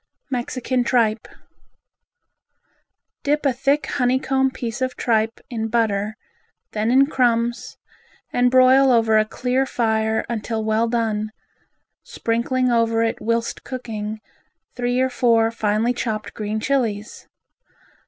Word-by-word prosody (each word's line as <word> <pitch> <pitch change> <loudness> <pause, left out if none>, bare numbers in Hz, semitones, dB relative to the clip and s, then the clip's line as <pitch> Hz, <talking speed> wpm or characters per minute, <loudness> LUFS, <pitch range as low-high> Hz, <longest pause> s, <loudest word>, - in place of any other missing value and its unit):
Mexican 250 0 -1
Tripe 230 -3 +1 1.9
Dip 295 +1 0
a 270 - +3
thick 275 +4 +1
honey 255 -2 +1
comb 265 0 +1
piece 240 -1 -5
of 255 0 -1
tripe 225 -1 0
in 225 -2 -3
butter, 215 -2 0 0.6
then 215 +1 -1
in 265 +3 +5
crumbs, 240 -4 0 0.6
and 245 0 +3
broil 260 +1 +5
over 225 -2 +4
a 215 - +2
clear 250 +4 -1
fire 220 -2 0
until 225 -1 -3
well 220 +1 +1
done, 220 -2 -1 0.7
sprinkling 245 +2 -1
over 230 -1 +2
it 225 - -2
whilst 230 +1 -1
cooking 220 -4 -5 0.5
three 245 0 -1
or 260 0 +2
four 230 -2 +3
finely 220 +1 0
chopped 220 -3 -4
green 215 0 -3
Chilis. 225 -4 -2
235 Hz, 120 wpm, -21 LUFS, 220-255 Hz, 1.9 s, in